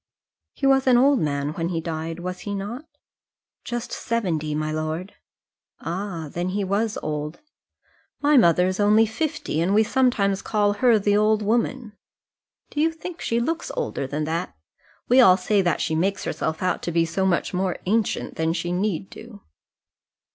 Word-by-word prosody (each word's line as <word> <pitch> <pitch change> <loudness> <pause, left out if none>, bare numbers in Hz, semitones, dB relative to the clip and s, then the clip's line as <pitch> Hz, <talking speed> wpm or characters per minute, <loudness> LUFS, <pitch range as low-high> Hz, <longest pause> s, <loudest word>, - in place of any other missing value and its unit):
"He 275 - -3
was 270 -1 +4
an 250 -2 +6
old 275 +1 +4
man 145 -2 -1
when 165 +1 -2
he 170 -2 -1
died, 165 +1 -5
was 180 +1 -5
he 205 -1 -4
not?" 220 +9 -5 0.8
"Just 240 0 -4
seventy, 165 -10 -2
my 155 0 -2
lord." 155 +4 -3 0.7
"Ah, 175 -2 -4
then 175 +1 -2
he 200 +2 -1
was 205 +3 -1
old. 150 - -4 0.8
My 295 +1 +3
mother 180 - +5
is 185 +1 -2
only 210 +2 +5
fifty, 225 - -2
and 190 +4 +1
we 220 - +5
sometimes 215 -5 +1
call 205 -2 +1
her 235 +1 +4
the 205 0 +2
old 215 0 +3
woman. 230 +1 -1 0.8
Do 295 - -1
you 325 +1 +3
think 330 +1 -8
she 230 - 0
looks 325 +8 -2
older 470 - -2
than 150 +3 -3
that? 160 - -3 0.5
We 255 +2 +6
all 185 -6 +7
say 200 +2 +1
that 175 -2 0
she 160 - -1
makes 190 +5 0
herself 160 +2 -3
out 180 -1 0
to 170 - -3
be 165 0 +2
so 165 +4 -2
much 190 -1 0
more 185 -1 -1
ancient 215 +2 -1
than 160 0 +1
she 175 0 -3
need 185 0 -1
do." 220 -3 -12
195 Hz, 175 wpm, -23 LUFS, 165-230 Hz, 0.8 s, all